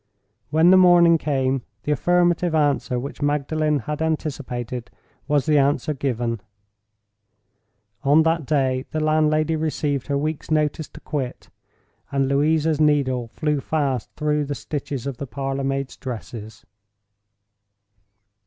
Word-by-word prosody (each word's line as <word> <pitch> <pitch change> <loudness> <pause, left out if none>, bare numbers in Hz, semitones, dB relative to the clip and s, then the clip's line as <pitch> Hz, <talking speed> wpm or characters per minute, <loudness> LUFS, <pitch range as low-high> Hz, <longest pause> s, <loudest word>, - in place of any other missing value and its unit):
When 160 +4 +5
the 190 - +7
morning 175 -2 +6
came, 135 -3 0 0.2
the 150 - -1
affirmative 175 +2 +2
answer 145 -4 +1
which 135 +5 -6
Magdalen 150 +1 +1
had 150 0 -4
anticipated 125 -6 -3 0.4
was 145 -2 +2
the 150 -2 +4
answer 140 +2 +1
given. 120 -5 -2 1.6
On 145 +3 +4
that 160 -3 0
day 130 -3 0
the 155 - -2
landlady 155 0 +2
received 150 -3 -1
her 140 -1 0
week's 155 +1 -3
notice 155 0 0
to - - -13
quit, 135 -4 -5 0.6
and 135 -1 +1
Louisa's 155 +2 +2
needle 135 -5 +2
flew 150 +5 -1
fast 140 -7 -1
through 150 -1 0
the 145 0 -3
stitches 140 -4 -5
of 140 -3 -4
the 140 - -6
parlor 135 +3 -3
maid's 135 0 -2
dress. 110 -3 -8
145 Hz, 125 wpm, -22 LUFS, 135-155 Hz, 1.6 s, the